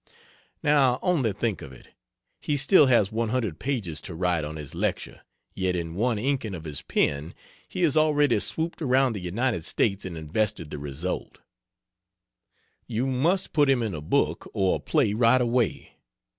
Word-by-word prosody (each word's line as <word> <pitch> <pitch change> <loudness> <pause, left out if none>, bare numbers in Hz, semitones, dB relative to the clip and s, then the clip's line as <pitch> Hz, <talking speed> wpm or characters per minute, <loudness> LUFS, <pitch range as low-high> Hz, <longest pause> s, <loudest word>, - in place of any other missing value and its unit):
Now 140 -4 +4
only 150 - +2
think 105 +1 -2
of - - -9
it! 65 - -15 0.5
He 145 - -1
still 140 +2 +5
has 115 -5 +3
100 110 -5 -1
pages 110 - -3
to 85 - -7
write 90 -2 0
on 75 +1 -5
his 75 -3 -7
lecture, - - -3 0.3
yet 95 -1 -1
in 85 -2 -4
one 115 +5 0
inking 120 -4 -1
of 80 - -8
his 75 -3 -6
pen 75 +3 -1 0.3
he 185 - -3
has 160 -4 +3
already 150 -2 +3
swooped 165 +1 -3
around 130 -3 +3
the 105 - -4
United 100 +2 -1
States 100 +3 0
and 90 -3 -6
invested 80 0 -2
the 75 - -5
result! 75 +6 -5 1.5
You 115 +4 -1
must 145 +9 +1
put 145 -3 +3
him 130 -3 +3
in 110 -4 -2
a 75 - -5
book 75 - 0
or 95 -1 +2
a - - -12
play 100 - +1
right 115 +3 +4
away. 120 -2 0
110 Hz, 170 wpm, -26 LUFS, 85-135 Hz, 1.5 s, still